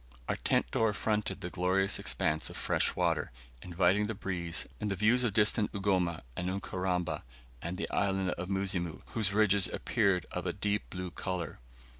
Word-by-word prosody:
Our -, -, 0 dB
tent -, -, +1 dB
door 110 Hz, -2 st, +2 dB
fronted 105 Hz, -1 st, -1 dB
the 90 Hz, -2 st, -4 dB
glorious 95 Hz, +2 st, +1 dB
expanse 80 Hz, 0 st, 0 dB
of -, -, -8 dB
fresh -, -, +1 dB
water, -, -, +1 dB, 0.3 s
inviting 90 Hz, +4 st, +2 dB
the 110 Hz, -, -3 dB
breeze, 90 Hz, -2 st, -1 dB
and 105 Hz, -, -2 dB
the 100 Hz, -, 0 dB
views 110 Hz, +6 st, +4 dB
of 120 Hz, -, +2 dB
distant 105 Hz, 0 st, +4 dB
Ugoma 95 Hz, -5 st, 0 dB
and 90 Hz, +1 st, -2 dB
Ukaramba, 90 Hz, -2 st, -2 dB, 0.4 s
and 85 Hz, +2 st, -4 dB
the -, -, -2 dB
Island 95 Hz, -2 st, +1 dB
of 90 Hz, +2 st, -4 dB
Muzimu, 95 Hz, -4 st, -1 dB
whose 110 Hz, -4 st, +1 dB
ridges 100 Hz, -2 st, +4 dB
appeared 100 Hz, -7 st, +1 dB
of -, -, -3 dB
a -, -, -1 dB
deep 105 Hz, 0 st, -1 dB
blue 90 Hz, -1 st, -5 dB
colour. 90 Hz, -6 st, -4 dB
95 Hz, 170 wpm, -31 LUFS, 90-105 Hz, 0.4 s, views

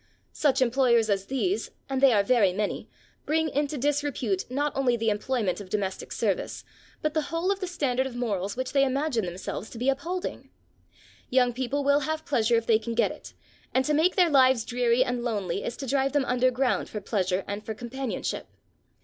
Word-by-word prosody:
Such 270 Hz, -3 st, +2 dB
employers 235 Hz, -3 st, +3 dB
as 195 Hz, -1 st, -1 dB
these, 360 Hz, -, -1 dB, 0.2 s
and 270 Hz, -1 st, -2 dB
they 275 Hz, -2 st, +7 dB
are 205 Hz, -3 st, +4 dB
very 205 Hz, -5 st, +3 dB
many, 205 Hz, +2 st, -3 dB, 0.4 s
bring 315 Hz, +1 st, +1 dB
into 290 Hz, +1 st, -1 dB
disrepute 275 Hz, -8 st, -1 dB
not 285 Hz, +3 st, -1 dB
only 255 Hz, -3 st, +2 dB
the 225 Hz, -1 st, +1 dB
employment 210 Hz, -3 st, -1 dB
of 190 Hz, -, -10 dB
domestic 195 Hz, -1 st, -3 dB
service, -, -, -2 dB, 0.4 s
but 305 Hz, 0 st, 0 dB
the 315 Hz, -, +1 dB
whole 335 Hz, +4 st, 0 dB
of 395 Hz, -, -1 dB
the 375 Hz, -, -3 dB
standard 265 Hz, -7 st, 0 dB
of 250 Hz, -, -9 dB
morals 205 Hz, -4 st, -2 dB
which 255 Hz, 0 st, -2 dB
they 275 Hz, -1 st, +4 dB
imagine 265 Hz, -, 0 dB
themselves 185 Hz, +4 st, -5 dB
to -, -, -10 dB
be 250 Hz, +4 st, +1 dB
upholding. 335 Hz, +7 st, -3 dB, 0.8 s
Young 250 Hz, -1 st, +3 dB
people 260 Hz, +3 st, -2 dB
will 285 Hz, +1 st, +4 dB
have 315 Hz, +2 st, -3 dB
pleasure 235 Hz, -4 st, +2 dB
if 230 Hz, 0 st, +1 dB
they 220 Hz, -1 st, +4 dB
can 230 Hz, +1 st, -5 dB
get 235 Hz, -, +2 dB
it, -, -, -11 dB, 0.4 s
and 260 Hz, 0 st, +3 dB
to 300 Hz, -, +1 dB
make 320 Hz, +5 st, +3 dB
their 355 Hz, -4 st, +4 dB
lives 260 Hz, -4 st, +5 dB
dreary 245 Hz, 0 st, +2 dB
and 245 Hz, -2 st, -2 dB
lonely 205 Hz, -7 st, -2 dB
is 240 Hz, -, -4 dB
to 275 Hz, -, -5 dB
drive 270 Hz, +1 st, +1 dB
them 290 Hz, -2 st, +2 dB
underground 250 Hz, +1 st, +1 dB
for 210 Hz, -, -4 dB
pleasure 190 Hz, -2 st, -1 dB
and 205 Hz, +1 st, -4 dB
for 220 Hz, -, -5 dB
companionship. 245 Hz, +2 st, -4 dB
255 Hz, 195 wpm, -27 LUFS, 225-280 Hz, 0.8 s, they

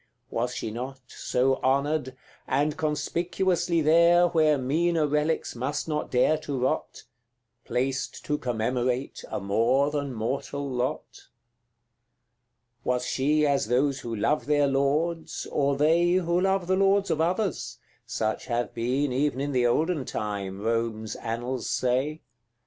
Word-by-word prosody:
Was 120 Hz, +2 st, -1 dB
she 110 Hz, -, -4 dB
not 130 Hz, +4 st, -6 dB
So 130 Hz, +1 st, 0 dB
honoured 140 Hz, 0 st, 0 dB, 0.3 s
and 145 Hz, +3 st, +1 dB
conspicuously 170 Hz, +3 st, 0 dB
there, 170 Hz, +3 st, +5 dB
Where 155 Hz, -3 st, +3 dB
meaner 160 Hz, +5 st, +1 dB
relics 150 Hz, +1 st, 0 dB
must 140 Hz, +6 st, -3 dB
not 150 Hz, -1 st, -2 dB
dare 140 Hz, +5 st, +3 dB
to 145 Hz, -3 st, -4 dB
rot, 130 Hz, -, -2 dB, 0.6 s
Placed 130 Hz, +2 st, -2 dB
to 150 Hz, 0 st, -1 dB
commemorate 125 Hz, +2 st, -1 dB
a -, -, -3 dB
more 115 Hz, +8 st, +2 dB
than 145 Hz, -2 st, -2 dB
mortal 135 Hz, +5 st, -3 dB
lot? 125 Hz, -1 st, -2 dB
CI. -, -, -14 dB, 1.6 s
Was 125 Hz, 0 st, 0 dB
she 150 Hz, +4 st, +2 dB
as 140 Hz, -6 st, +1 dB
those 135 Hz, +3 st, +1 dB
who 115 Hz, -3 st, -5 dB
love 125 Hz, +4 st, 0 dB
their 145 Hz, -1 st, +3 dB
lords, 150 Hz, +5 st, 0 dB
or 140 Hz, -1 st, +1 dB
they 165 Hz, +4 st, +3 dB
Who 175 Hz, -1 st, +1 dB
love 190 Hz, -1 st, +1 dB
the 185 Hz, +2 st, +2 dB
lords 195 Hz, +1 st, +3 dB
of 160 Hz, -, +1 dB
others? 180 Hz, +2 st, -1 dB, 0.3 s
such 110 Hz, 0 st, -2 dB
have 120 Hz, 0 st, -1 dB
been 125 Hz, +4 st, 0 dB
Even 135 Hz, 0 st, 0 dB
in 145 Hz, +1 st, -2 dB
the 125 Hz, -2 st, +2 dB
olden 155 Hz, +3 st, +1 dB
time, 100 Hz, -2 st, -4 dB
Rome's 115 Hz, -1 st, -1 dB
annals 120 Hz, +2 st, -3 dB
say. 130 Hz, +5 st, 0 dB
140 Hz, 140 wpm, -26 LUFS, 125-155 Hz, 1.6 s, there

